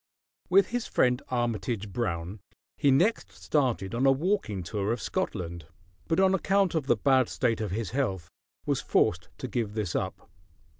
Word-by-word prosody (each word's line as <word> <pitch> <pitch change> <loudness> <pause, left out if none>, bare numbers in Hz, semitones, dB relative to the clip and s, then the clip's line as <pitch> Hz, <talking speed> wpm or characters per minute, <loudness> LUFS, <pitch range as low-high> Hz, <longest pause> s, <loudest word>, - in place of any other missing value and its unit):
With 190 +1 +5
his 245 -1 -2
friend 125 +1 +2
Armitage 115 -4 -2
Brown 95 -3 -3 0.4
he 140 - +2
next 135 - +2
started 110 - -1
on 125 +4 +2
a - - +7
walking 135 - 0
tour 100 +3 -2
of 120 - -1
Scotland; 85 - -3 0.4
but 165 - +1
on 190 0 +4
account 195 0 +2
of 155 -5 -1
the 120 - +3
bad 130 +2 +3
state 115 -3 0
of 105 - -2
his 105 +2 -3
health 100 - -1 0.4
was - - 0
forced - - +1
to - - -5
give 110 -3 -2
this 105 -6 -2
up. - - -3
120 Hz, 165 wpm, -28 LUFS, 100-145 Hz, 0.4 s, a